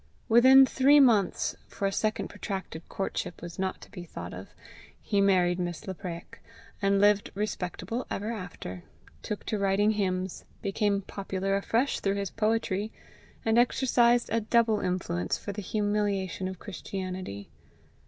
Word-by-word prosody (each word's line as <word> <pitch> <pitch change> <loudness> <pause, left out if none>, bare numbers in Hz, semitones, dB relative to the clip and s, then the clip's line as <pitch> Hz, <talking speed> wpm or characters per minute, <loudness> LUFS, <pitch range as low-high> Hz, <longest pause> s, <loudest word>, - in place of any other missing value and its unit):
Within 260 +4 +8
three 275 +3 +5
months, 220 -9 +3
for 200 - -4
a 195 - +2
second 215 +2 -1
protracted 190 -5 -5
courtship 195 -2 -3
was 170 0 -9
not 190 0 -2
to - - -14
be 180 - -8
thought 90 - -8
of, 90 +2 -8 0.5
he 200 -2 0
married 180 -2 +3
Miss 175 -2 -4
Lapraik, 175 -2 -7 0.4
and 200 0 +3
lived 205 0 +4
respectable 205 +2 -3
ever 210 +3 -3
after 165 - -7 0.4
took 210 - -5
to 215 - -2
writing 200 +2 +3
hymns, 185 -3 -2 0.2
became 200 0 0
popular 195 0 -2
afresh 230 +7 0
through 195 0 0
his 200 -2 -3
poetry, 215 -2 0 0.5
and 225 +1 +4
exercised 240 -1 +3
a 230 - +2
double 225 -1 +3
influence 175 - -1
for 205 - -6
the 205 +1 -5
humiliation 205 -2 -1
of 190 0 -6
Christianity. 185 - -6
200 Hz, 145 wpm, -28 LUFS, 185-215 Hz, 0.5 s, Within